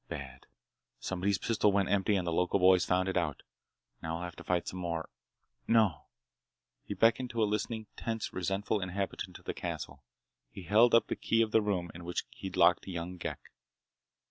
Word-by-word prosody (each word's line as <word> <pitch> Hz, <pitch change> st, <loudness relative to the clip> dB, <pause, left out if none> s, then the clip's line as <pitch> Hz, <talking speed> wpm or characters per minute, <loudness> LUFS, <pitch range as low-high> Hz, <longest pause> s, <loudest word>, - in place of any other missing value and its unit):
"Bad! 65 Hz, -1 st, -8 dB, 0.5 s
Somebody's 95 Hz, +1 st, 0 dB
pistol 105 Hz, 0 st, +2 dB
went 100 Hz, -1 st, +1 dB
empty 100 Hz, +1 st, +2 dB
and 95 Hz, -2 st, 0 dB
the 85 Hz, -, -1 dB
local 90 Hz, +3 st, +2 dB
boys 90 Hz, -1 st, +5 dB
found 95 Hz, +1 st, +1 dB
it 95 Hz, -, -1 dB
out. 85 Hz, -6 st, -1 dB, 0.6 s
Now 80 Hz, 0 st, -3 dB
we'll 85 Hz, -, -5 dB
have 85 Hz, -1 st, -6 dB
to -, -, -9 dB
fight 90 Hz, -1 st, 0 dB
some 90 Hz, -, -5 dB
more—no." 90 Hz, +3 st, -2 dB, 0.8 s
He 100 Hz, -, -5 dB
beckoned 115 Hz, +5 st, +3 dB
to 115 Hz, -2 st, 0 dB
a -, -, +5 dB
listening, 110 Hz, +1 st, -2 dB
tense, 115 Hz, -1 st, -3 dB
resentful 95 Hz, +3 st, -1 dB
inhabitant 95 Hz, +2 st, -4 dB
of -, -, -21 dB
the -, -, -3 dB
castle. 70 Hz, -1 st, -6 dB, 0.5 s
He 95 Hz, -, -10 dB
held 115 Hz, +6 st, +5 dB
up 115 Hz, -, +5 dB
the -, -, -3 dB
key 115 Hz, 0 st, +2 dB
of 110 Hz, -, -3 dB
the 110 Hz, -, +4 dB
room 95 Hz, -5 st, -1 dB
in 85 Hz, -, -9 dB
which 85 Hz, +1 st, -3 dB
he'd 95 Hz, -2 st, -7 dB
locked 85 Hz, +3 st, +4 dB
young 90 Hz, 0 st, -5 dB
Ghek. 85 Hz, -, -6 dB
95 Hz, 185 wpm, -31 LUFS, 85-105 Hz, 0.8 s, boys